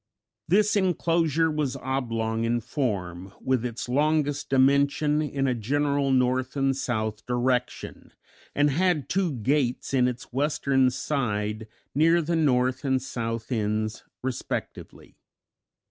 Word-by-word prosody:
This 210 +5 +3
inclosure 165 -4 +2
was 150 -3 -1
oblong 115 -4 -2
in 120 +1 +1
form, 100 - -3
with 130 -3 0
its 120 -1 -4
longest 145 +2 +1
dimension 140 +3 +3
in 140 -2 -1
a 130 - +2
general 140 +4 0
north 130 0 +1
and 135 -1 +2
south 110 -5 -2
direction, 125 0 -2 0.4
and 145 0 +3
had 175 -1 +1
two 190 -3 +1
gates 130 +2 -1
in 125 -2 +4
its 125 -1 -6
western 135 -1 +2
side, 110 -5 -2 0.3
near 165 +4 +4
the 170 +2 -1
north 130 -5 +1
and 130 -2 +1
south 115 -2 -4
ends 110 -1 -1 0.2
respectively. 130 -2 -5
130 Hz, 120 wpm, -26 LUFS, 120-145 Hz, 0.4 s, in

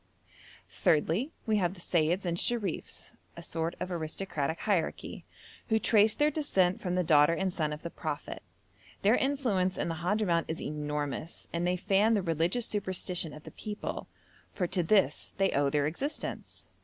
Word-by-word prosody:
Thirdly, 170 - +1
we 220 -1 +2
have 180 -1 0
the - - -14
Seyyids 175 +2 +1
and 170 -1 0
Sherifs, 205 -2 -1 0.3
a - - -8
sort 165 +1 -2
of 185 - -4
aristocratic 160 -2 -3
hierarchy, 190 -7 -1 0.4
who 220 - +4
trace 215 0 +5
their 300 +1 +3
descent 195 - +1
from 180 -1 -1
the 180 - +2
daughter 150 0 +5
and 190 0 -1
son 155 -4 -1
of 150 +1 -6
the 170 - -5
Prophet. - - -5 0.6
Their 205 +3 +5
influence 240 -10 +1
in - - -1
the 165 0 -4
Hadhramout 180 -2 +1
is 160 - -3
enormous, 150 0 -4
and 170 +1 0
they 180 0 +1
fan 205 +4 +3
the 200 - 0
religious 170 +8 +1
superstition 185 -4 -1
of 150 - -11
the - - -10
people, 210 -1 -5 0.5
for 180 - 0
to 180 +1 +1
this 195 +4 +2
they 195 0 +2
owe 140 0 +2
their 145 0 +1
existence. 260 - -4
180 Hz, 165 wpm, -30 LUFS, 160-205 Hz, 0.6 s, trace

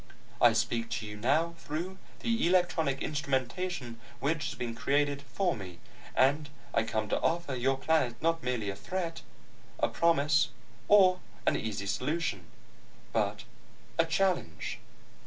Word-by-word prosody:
I - - +7
speak 115 -1 0
to 110 - -5
you 105 0 -6
now 145 +10 +2
through 175 +6 -4 0.2
the 230 -6 +1
electronic 175 -6 +2
instrumentation 140 -2 -2 0.2
which 150 +4 0
has 145 0 -3
been 120 -1 -3
created 145 +3 +1
for 175 +5 0
me, 95 -4 -8 0.4
and 145 +3 +3 0.2
I - - +4
come 110 -1 -1
to - - 0
offer 170 -4 0
your 130 +2 +1
planet 135 -5 +1
not 165 +1 +1
merely 120 -5 -1
a - - -7
threat, 170 - -3 0.6
a - - +2
promise, 150 -3 +3 0.4
or 185 -3 +6 0.3
an - - +3
easy 105 -2 -3
solution 120 - -1 0.7
but - - 0 0.6
a 165 - +6
challenge." 175 - 0
145 Hz, 140 wpm, -31 LUFS, 120-170 Hz, 0.7 s, I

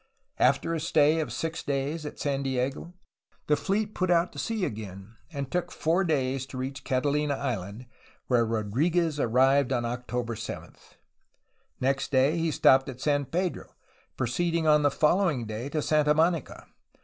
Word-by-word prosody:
After 140 +5 +2
a 165 - -1
stay 155 0 +3
of 155 - -2
six 165 0 -3
days 145 +3 -2
at - - -9
San 140 -1 -1
Diego, 135 +4 -2 0.5
the 150 - +3
fleet 210 +5 -1
put 185 - 0
to 175 0 +1
sea 220 -4 -1
again, 105 - -7 0.2
and 140 -3 -5
took 180 0 -1
four 170 +4 +1
days 135 -5 -1
to 130 - -8
reach 135 +2 -5
CataUna 145 +2 0
Island, 110 -3 -4 0.4
where 120 -2 +3
Rodriguez 145 - 0
arrived 135 +2 +3
on 120 -2 0
Octo 125 +1 -3
ber 115 0 -5
7. - - -7 1.0
Next 135 +1 0
day, 135 +4 +3
he 165 0 +1
stopped 135 -3 +4
at 130 -1 -8
San 145 0 +1
Pedro, 180 +5 -3 0.4
proceeding 165 +7 0
on 150 -1 +5
the 145 - +4
following 150 - +2
day 110 +5 -5
to 155 0 -2
Santa 150 -1 +3
Monica. 165 -2 0
140 Hz, 160 wpm, -27 LUFS, 130-160 Hz, 1.0 s, on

